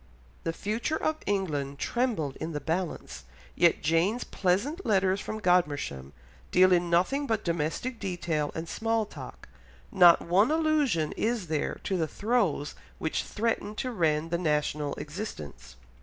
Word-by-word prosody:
The 165 - +1
future 215 - -2
of 310 0 -1
England 150 -9 -1
trembled 220 - -1
in 165 - -4
the 150 - -2
balance, 165 - -3 0.3
yet 170 - +3
Jane's 170 +10 +2
pleasant 210 - 0
letters 195 -2 +2
from 215 - -5
Godmersham 145 - +1 0.4
deal 185 0 +5
in 175 -1 +2
nothing 225 +12 +2
but 220 -3 0
domestic 170 +9 -2
detail 170 -6 -2
and 160 +1 -4
small 225 +4 0
talk, - - -10 0.4
not 175 -4 +7
one 190 +7 +3
allusion 300 - +2
is 220 -7 -1
there 155 -2 -1
to 190 - -1
the 160 -2 0
throes 200 -8 0 0.2
which 160 - -1
threatened 215 -1 -2
to 255 - -2
rend 165 -5 0
the 170 - +1
national 150 -3 0
existence. 75 - -7
180 Hz, 140 wpm, -28 LUFS, 155-220 Hz, 0.4 s, not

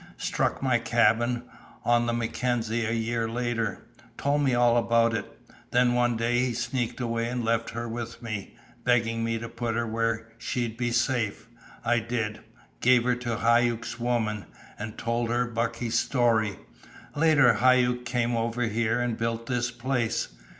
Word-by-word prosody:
"Struck - - -1
my 125 -3 +3
cabin, 120 +1 +2 0.4
on 120 0 +3
the - - +1
Mackenzie, 115 -1 -1
a - - -1
year 115 0 -1
later. 115 -4 -2 0.3
Told 145 +1 +1
me 135 -4 +2
all 120 -1 +4
about 115 -1 +3
it. 115 - -3 0.4
Then 125 0 +3
one 120 -1 +2
day 120 +1 +1
he 125 -1 +1
sneaked 120 +1 -2
away 115 -1 -1
and 120 -1 -2
left 115 0 +1
her 115 +1 -4
with 115 0 -5
me, 110 -5 -6 0.3
begging 115 -2 +2
me 115 0 0
to 115 +1 -5
put 115 0 -3
her 115 0 0
where 115 0 -1
she'd 120 -2 -2
be 120 0 -1
safe. 120 -3 0 0.4
I 120 0 +3
did. 115 -2 -3 0.4
Gave 125 -1 +5
her 125 0 +2
to 120 -2 -3
Hauck's 120 0 +1
woman, 115 -4 -1 0.3
and 105 +1 -6
told 115 0 -1
her 120 +1 +1
Bucky's 115 0 -1
story. 115 -6 +1 0.6
Later, 145 -5 +5
Hauck 125 +1 +3
came 120 -1 0
over 115 +1 -1
here 115 +1 0
and 120 -2 0
built 115 0 -2
this 125 0 -1
place. 120 -1 -1
120 Hz, 160 wpm, -27 LUFS, 115-120 Hz, 0.6 s, Gave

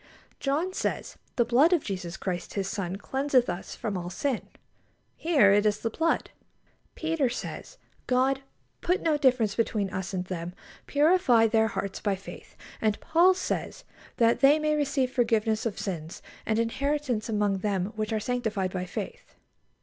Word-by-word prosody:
John 310 +7 0
says: - - -3 0.2
"The 240 - +3
blood 280 +10 +4
of 335 - +2
Jesus 185 -3 -5
Christ 180 -2 -4
His 195 -2 -1
Son 195 -3 -3
cleanseth 265 +4 +1
us 175 +1 -5
from 210 -3 -3
all 175 -1 -4
sin." 255 +6 -2 0.7
Here 290 - +4
it 205 0 +4
is 210 -1 +1
the 230 - -1
blood. 330 +7 0 0.6
Peter 320 -5 0
says: 250 - -6 0.3
"God...put 270 +7 -1
no 320 -2 +3
difference 255 -7 +3
between 210 -4 0
us 190 0 -4
and 185 -2 -2
them, 175 -1 -5 0.3
purifying 290 -7 +4
their 220 0 +3
hearts 200 -3 -4
by 205 -2 0
faith." 190 - -11 0.3
And 215 -2 +1
Paul 350 +3 +4
says: 440 +6 -3 0.3
"That 230 0 +4
they 280 +2 +6
may 305 0 +1
receive 280 -3 0
forgiveness 225 -3 +1
of 210 - -5
sins, 170 -4 -5 0.2
and 220 - +1
inheritance 250 0 -1
among 205 -2 +1
them 195 0 -1
which 215 0 -2
are 220 - +1
sanctified 220 -5 -1
by 180 -1 -2
faith." 480 - -7
230 Hz, 155 wpm, -27 LUFS, 200-280 Hz, 0.7 s, they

